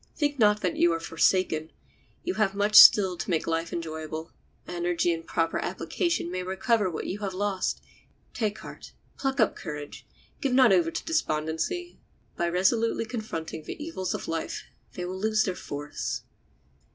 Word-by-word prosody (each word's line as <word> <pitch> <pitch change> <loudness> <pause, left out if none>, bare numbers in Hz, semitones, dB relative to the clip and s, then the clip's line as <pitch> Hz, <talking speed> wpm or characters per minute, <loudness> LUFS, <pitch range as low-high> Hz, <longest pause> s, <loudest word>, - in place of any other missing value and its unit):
Think 290 -3 -1
not 210 -1 +4
that 180 -3 -1
you 170 - +4
are 165 - -2
forsaken; 165 -1 +1 0.5
you 365 - -1
have 200 -2 +1
much 205 +1 +1
still 190 -3 +9
to - - -5
make 165 -3 +1
life 165 0 -1
enjoyable. 160 -1 -5 0.4
Energy 175 0 0
and 165 0 -5
proper 165 -1 0
application 340 - -2
may 185 0 -2
recover 190 +3 +1
what 165 - -5
you 200 - -4
have 195 -3 -4
lost; 195 -1 -1 0.5
take 215 -3 -1
heart; - - -11 0.3
pluck 270 0 -1
up 220 - +3
courage; 150 -3 -7 0.3
give 275 -3 0
not 250 -5 +6
over 175 -3 +3
to - - -5
despondency; 320 - -2 0.4
by 170 0 0
resolutely 225 +6 +1
confronting 215 -9 -5
the - - -6
evils 295 - -3
of - - -6
life 165 0 -3 0.3
they 180 - -4
will 185 +1 -5
lose 215 +1 +2
their 185 - -1
force. 145 -4 -5
185 Hz, 165 wpm, -27 LUFS, 165-220 Hz, 0.5 s, still